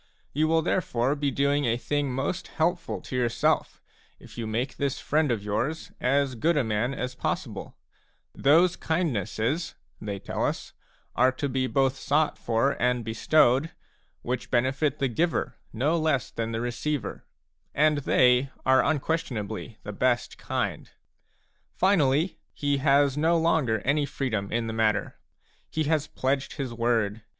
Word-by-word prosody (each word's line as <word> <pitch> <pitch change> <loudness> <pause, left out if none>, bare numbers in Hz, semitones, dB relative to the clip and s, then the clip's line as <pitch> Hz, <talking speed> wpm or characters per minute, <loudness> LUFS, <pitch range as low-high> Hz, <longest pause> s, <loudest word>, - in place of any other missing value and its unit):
You 155 +2 +2
will 160 0 +2
therefore 135 -7 0
be 145 -1 0
doing 140 +1 +1
a 115 0 +1
thing 145 +2 -1
most 135 +8 -2
helpful 170 +2 -1
to - - -7
yourself 120 -2 0 0.4
if - - -14
you 115 -2 -4
make 115 +5 -2
this 140 -2 -1
friend 155 0 +1
of 115 -4 -1
yours 115 +10 -2
as 135 +1 +2
good 155 +7 +1
a 145 - +3
raan 110 +4 -1
as 125 -1 -3
possible; - - -4 0.6
those 165 +5 +4
kindnesses, 145 - -1 0.3
they 100 -2 -4
tell - - -4
us, - - -2 0.4
are 125 +2 +4
to 140 +2 -2
be 130 -1 0
both 135 0 +1
sought 150 +3 +1
for 115 +4 +1
and 125 -1 +1
bestowed, 130 +5 +3 0.5
which 125 0 -3
benefit 130 +4 +1
the 140 - +1
giver 160 +7 -1
no 150 +9 +1
less 155 -5 0
than 115 0 -3
the 115 0 -2
receiver; 120 +1 -3 0.5
and 150 0 +3
they 125 -1 +3 0.2
are 130 0 +5
unquestionably 130 -8 -2
the 105 - -6
best 120 +3 0
kind. - - -3 0.9
Finally, 165 -3 +2 0.2
he 145 -1 0
has 140 0 +3
no 165 +3 +3
longer 155 -10 +2
any 145 +3 +1
freedom 110 -9 -2
in 115 0 0
the 110 - -4
matter; 110 -1 0 0.5
he 155 - -1
has 155 0 +1
pledged 135 +1 -1
his 135 -5 -4
word. 115 -2 0
135 Hz, 150 wpm, -27 LUFS, 120-150 Hz, 0.9 s, are